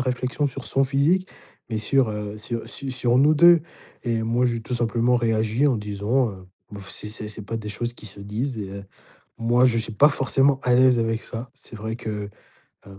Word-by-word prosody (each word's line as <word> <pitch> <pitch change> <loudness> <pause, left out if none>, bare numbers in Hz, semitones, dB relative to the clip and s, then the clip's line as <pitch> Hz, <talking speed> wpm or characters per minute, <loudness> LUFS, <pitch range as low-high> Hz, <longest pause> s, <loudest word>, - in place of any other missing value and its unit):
réflexion 130 +3 -1
sur 135 -1 -5
son 135 0 +2
physique, 150 +8 +1 0.4
mais 110 -2 -2
sur, 130 +2 +2
heu, 105 0 -5
sur, 115 +2 -3
heu, - - -11
su 135 -1 -5
sur 125 -1 +2
nous 150 +3 +5
2 170 +1 +7 0.4
et 115 -2 0
moi, 120 +3 +1
j'ai 115 -1 -1
tout 125 - -3
simplement 120 +1 +2
réagi 115 +3 +1
en 130 -5 +2
disant, 105 +4 -1
heu: 95 -1 -12 0.3
«B - - -7
oh, - - -8
c'est 105 - -3
c'est 105 0 -2
c'est 105 0 -4
pas 115 +3 -5
des 105 -1 -6
choses 120 +3 -4
qui - - -12
se 100 0 -4
disent.» 110 +5 -4
et, 95 -2 -5
heu, 100 0 -8 0.5
moi, 120 +2 +2
je 115 -2 +3
suis 110 -1 -2
pas 145 +7 +6
forcément 135 0 +2
à 125 - +3
l'aise 125 -1 +5
avec 115 0 -1
ça. 120 +1 -7
C'est 130 -3 -10
vrai 110 +1 -5
que, 105 -3 -5 0.6
heu, 95 0 -13
120 Hz, 220 wpm, -23 LUFS, 105-130 Hz, 0.6 s, 2